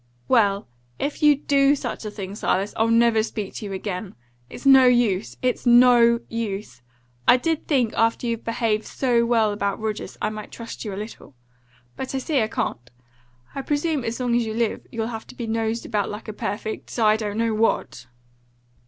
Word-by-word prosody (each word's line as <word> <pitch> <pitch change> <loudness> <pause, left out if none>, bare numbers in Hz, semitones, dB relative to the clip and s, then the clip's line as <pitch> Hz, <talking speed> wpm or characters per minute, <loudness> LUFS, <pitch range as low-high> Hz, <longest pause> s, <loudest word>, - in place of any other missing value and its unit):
"Well, 205 -5 +2 0.3
if 285 - -3
you 300 -1 +6
DO 280 0 +3
such 265 - -5
a - - -3
thing, 200 -2 -7
Silas, 200 -1 -1
I'll 225 - +2
never 230 -1 +4
speak 215 -2 -5
to 215 - -6
you 200 - -6
again! 190 0 -5 0.3
It's - - -10
no 265 -2 +8
USE! 230 -6 +2
It's 250 0 0
NO 240 -1 +6
use! 205 - -5 0.5
I 250 - +7
did 320 +4 -2
think, 250 -7 +1
after 230 +2 +1
you'd 230 -1 -2
behaved 225 -2 -1
so 240 -3 +1
well 225 -3 +2
about 200 -1 -2
Rogers, 215 -1 -4
I - - -1
might 215 -1 -8
trust 230 -1 -8
you 210 - -5
a - - -5
little. 210 - -9 0.6
But 265 +1 -4
I - - +1
see 270 0 0
I 215 - +1
can't. 120 - -3 0.6
I 275 - -4
presume 295 0 -1
as 230 +1 -3
long 245 -2 +1
as 240 - +2
you 220 -1 -4
live 230 -2 -1
you'll 225 -1 -2
have 225 -1 -6
to - - -13
be 235 - -5
nosed 225 0 -2
about 210 -3 -1
like 210 +2 -7
a 215 - -5
perfect 215 +3 -5
I 215 -2 +4
don't 210 -1 -3
know 230 -1 +1
what!" 215 - 0
230 Hz, 195 wpm, -23 LUFS, 210-245 Hz, 0.6 s, no